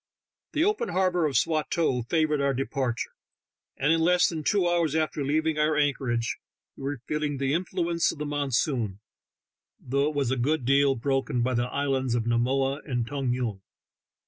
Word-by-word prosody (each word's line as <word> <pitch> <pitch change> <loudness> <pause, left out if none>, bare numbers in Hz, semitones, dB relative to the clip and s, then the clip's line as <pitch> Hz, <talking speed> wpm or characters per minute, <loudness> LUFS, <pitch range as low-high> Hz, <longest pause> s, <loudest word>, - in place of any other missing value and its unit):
The 310 - +2
open 425 +4 +1
harbor 180 -3 +2
of 135 -5 0
Swatow 155 -2 +1
favored 150 +3 +1
our 140 -1 +1
departure, 130 -2 -2 0.7
and 145 +4 +3
in 165 - +2
less 180 +2 +4
than 160 -3 -4
two 190 +2 +2
hours 170 -3 +1
after 155 -1 0
leav 155 +3 +1
ing 155 -1 0
our 150 0 +2
anchor 140 -4 +1
age 115 0 -1 0.4
we 135 - -8
were 140 -3 -3
feel 150 0 -2
ing 145 -2 -1
the 135 +1 0
influence 170 -1 0
of - - -10
the 150 - -4
monsoon, 135 -7 -1 0.8
though 140 +3 0
it 155 - -7
was 135 -4 0
a 130 - 0
good 135 +2 0
deal 140 +1 +4
broken 135 0 0
by 130 +1 0
the 120 0 0
islands 135 -3 0
of 120 - 0
Namoa 135 +4 +1
and 120 -5 -2
Tong 135 -1 -2
Yung. 120 -6 -2
140 Hz, 185 wpm, -27 LUFS, 130-155 Hz, 0.8 s, less